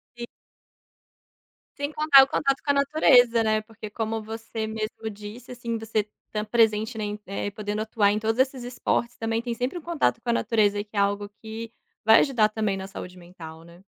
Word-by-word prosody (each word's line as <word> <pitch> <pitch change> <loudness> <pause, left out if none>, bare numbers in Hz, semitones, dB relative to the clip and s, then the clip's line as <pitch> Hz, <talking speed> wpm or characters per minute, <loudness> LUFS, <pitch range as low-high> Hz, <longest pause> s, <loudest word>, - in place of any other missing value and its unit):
E 240 0 -7 1.5
Sem 285 +1 -3
contar 295 -3 +7
o - - -1
contato 275 0 0
com 285 - +2
a - - +2
natureza, 250 -5 +4
né. 215 0 +1
Porque 215 -1 -10
como 225 +1 -3
você 220 0 -5
mesmo 220 0 -4
disse, 210 +4 -10
assim, 235 -2 -4
você 220 -1 -1 0.3
tá 210 0 -2
presente 220 0 +2
na 215 - -3
em, 210 0 -4
eh, 200 +1 -4
podendo 210 +1 -4
atuar 215 -2 +2
em 210 - 0
todos 225 +3 -1
esses 260 -1 +1
esportes, 245 0 -2
também 225 0 -1
tem 240 -1 -3
sempre 250 +9 -3
um - - -14
contato 320 -8 0
com 240 - -5
a - - +3
natureza 205 -3 +1
que 210 0 -19
é - - +1
algo 200 0 0
que 220 +1 -7 0.3
vai 220 0 +8
ajudar 230 -7 +3
também 215 -3 -1
na 190 0 -6
saúde 185 -2 -9
mental, 165 -2 -11
né. 170 +2 -17
220 Hz, 200 wpm, -25 LUFS, 210-240 Hz, 1.5 s, vai